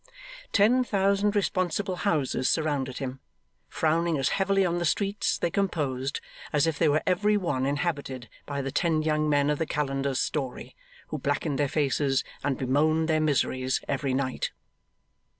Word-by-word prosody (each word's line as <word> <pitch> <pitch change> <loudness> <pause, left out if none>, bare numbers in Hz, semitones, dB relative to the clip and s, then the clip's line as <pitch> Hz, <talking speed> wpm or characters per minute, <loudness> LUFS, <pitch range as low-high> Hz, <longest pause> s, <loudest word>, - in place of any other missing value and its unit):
Ten 230 +5 +4
thousand 200 -1 +1
responsible 185 -1 0
houses 150 -9 0
surrounded 145 -5 0
him, 135 -1 -5 0.5
frowning 165 +1 +1
as 135 -1 +1
heavily 195 0 +2
on 175 0 0
the - - -1
streets 200 +5 0
they 170 - -1
composed, 145 -9 -1 0.3
as 150 0 +3
if 160 -3 -1
they 165 - +4
were 150 +2 +2
every 210 +3 +2
one 135 -9 -1
inhabited 140 -4 -2 0.2
by 140 -1 -3
the 135 - -3
ten 155 +1 +1
young 155 -1 +1
men 145 0 +3
of 150 - -1
the 160 - -1
Calender's 135 -2 -1
story, 135 -5 -3 0.3
who - - -4
blackened 145 -4 -1
their 145 -2 +2
faces 140 -2 +1 0.2
and 140 -2 0
bemoaned 155 +5 +2
their 155 -1 +3
miseries 130 -3 +1
every 135 -1 -1
night. 130 -1 -1
150 Hz, 155 wpm, -27 LUFS, 135-175 Hz, 0.5 s, Ten